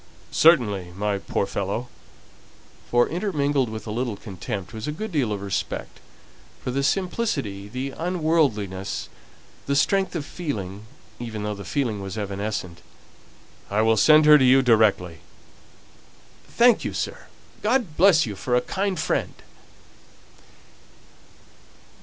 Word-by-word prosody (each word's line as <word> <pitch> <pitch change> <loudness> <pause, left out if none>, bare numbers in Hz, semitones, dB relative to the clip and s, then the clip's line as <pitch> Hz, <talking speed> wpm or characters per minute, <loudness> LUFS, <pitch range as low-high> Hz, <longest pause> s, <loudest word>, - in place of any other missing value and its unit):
"Certainly, 105 - +3
my 105 0 -1
poor 100 - -1
fellow" 100 +5 -3 1.0
for, 120 0 +3
intermingled 145 - 0
with 110 -1 -7
a 110 - -5
little 120 -1 -2
contempt, 95 0 -6
was 110 +3 -6
a - - -1
good 215 +8 -5
deal 135 -9 0
of 100 -1 -3
respect 100 -1 -4 0.6
for 125 - -2
the 135 +2 0
simplicity, 140 - -1
the 130 +4 -4
unworldliness, 155 - -1 0.6
the 140 - +1
strength 190 +6 +2
of 155 -4 -3
feeling, 105 - -5 0.3
even 110 -3 -5
though 105 0 -2
the 100 -1 -8
feeling 110 -1 -2
was 95 +1 -6
evanescent 100 -3 -4 0.9
"I 105 +2 +1
will 110 0 +4
send 155 +8 +6
her 150 0 +8
to - - +3
you 130 +1 +6
directly." 105 -8 +3 1.3
"Thank 240 -1 +4
you, - - -3
sir. - - -4 0.3
God 220 - 0
bless 175 -3 +5
you 105 -3 -5
for 125 +6 -1
a 125 - +3
kind 195 +1 -2
friend!" - - -1
120 Hz, 130 wpm, -24 LUFS, 100-155 Hz, 1.3 s, her